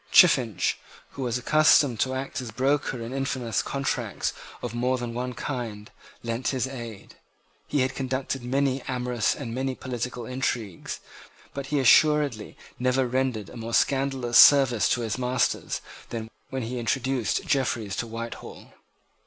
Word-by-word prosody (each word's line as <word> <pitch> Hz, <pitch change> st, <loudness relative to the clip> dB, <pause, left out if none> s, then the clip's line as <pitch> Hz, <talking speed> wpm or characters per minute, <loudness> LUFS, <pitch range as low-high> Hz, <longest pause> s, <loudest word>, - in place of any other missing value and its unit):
Chiffinch, 125 Hz, -, +5 dB, 0.3 s
who 140 Hz, -, -8 dB
was 125 Hz, -2 st, 0 dB
accustomed 145 Hz, -2 st, +4 dB
to 130 Hz, +3 st, +1 dB
act 130 Hz, 0 st, -4 dB
as 125 Hz, -, -6 dB
broker 135 Hz, +2 st, 0 dB
in 115 Hz, +3 st, -6 dB
infamous 130 Hz, -5 st, -1 dB
contracts 140 Hz, 0 st, -2 dB, 0.3 s
of 120 Hz, -2 st, -3 dB
more 125 Hz, +2 st, +1 dB
than 120 Hz, -1 st, -4 dB
one 125 Hz, +1 st, -3 dB
kind, 115 Hz, -6 st, -5 dB, 0.3 s
lent 115 Hz, +2 st, -2 dB
his 130 Hz, -2 st, 0 dB
aid. 120 Hz, -6 st, -8 dB, 0.5 s
He 145 Hz, -, +1 dB
had 130 Hz, +1 st, 0 dB
conducted 130 Hz, 0 st, -3 dB
many 135 Hz, +1 st, 0 dB
amorous 125 Hz, -3 st, 0 dB
and 120 Hz, -5 st, -6 dB
many 130 Hz, +1 st, -2 dB
political 125 Hz, -1 st, -4 dB
intrigues; 120 Hz, -7 st, -3 dB, 0.5 s
but 140 Hz, -1 st, -5 dB
he 145 Hz, -, 0 dB
assuredly 140 Hz, -3 st, +4 dB, 0.2 s
never 125 Hz, +1 st, +2 dB
rendered 125 Hz, -5 st, -1 dB
a -, -, -10 dB
more 115 Hz, 0 st, -2 dB
scandalous 135 Hz, -3 st, +2 dB
service 135 Hz, -6 st, +7 dB
to 120 Hz, -, +1 dB
his 115 Hz, +1 st, -2 dB
masters 125 Hz, 0 st, 0 dB, 0.3 s
than 110 Hz, -1 st, -5 dB, 0.2 s
when 130 Hz, -2 st, -3 dB
he 120 Hz, +2 st, -4 dB
introduced 125 Hz, 0 st, 0 dB
Jeffreys 120 Hz, -7 st, 0 dB
to 120 Hz, -, -2 dB
Whitehall. 115 Hz, +1 st, -8 dB
125 Hz, 145 wpm, -26 LUFS, 115-135 Hz, 0.5 s, service